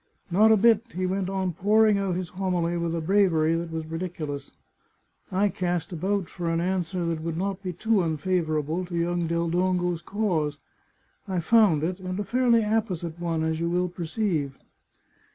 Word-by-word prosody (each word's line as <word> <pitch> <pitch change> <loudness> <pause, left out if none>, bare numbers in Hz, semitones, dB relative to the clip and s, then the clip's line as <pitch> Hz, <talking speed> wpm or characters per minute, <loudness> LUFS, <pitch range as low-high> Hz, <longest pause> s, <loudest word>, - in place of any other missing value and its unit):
Not 215 +5 +5
a 220 - +6
bit, 225 0 +5
he 185 +1 -1
went 190 0 -1
on 190 -2 -1
pouring 210 +3 +3
out 195 -3 -1
his 180 -2 -3
homily 180 -2 -1
with 170 -1 -1
a 165 - -2
bravery 165 -3 +3
that 165 0 -2
was 160 -1 -4
ridiculous. 160 -3 -5 0.8
I 195 +2 +2
cast 175 -3 -2
about 190 +2 -1
for 170 -1 -4
an 165 0 +1
answer 180 0 -1
that 165 -1 -2
would 165 0 -3
not 195 +1 -2
be 185 -2 -3
too 215 +4 +1
unfavourable 160 0 -1
to 175 -1 -5
young 170 0 0
Del 170 +1 0
Dongo's 180 -1 0
cause. 175 -9 -1 0.7
I 185 -2 -1
found 175 -4 +4
it, 180 +3 -2
and 185 +1 -4
a - - 0
fairly 235 0 +3
apposite 185 -7 -1
one, 165 -2 -1
as 160 0 -1
you 170 0 0
will 180 +1 0
perceive. 170 -5 -2
180 Hz, 175 wpm, -26 LUFS, 165-195 Hz, 0.8 s, a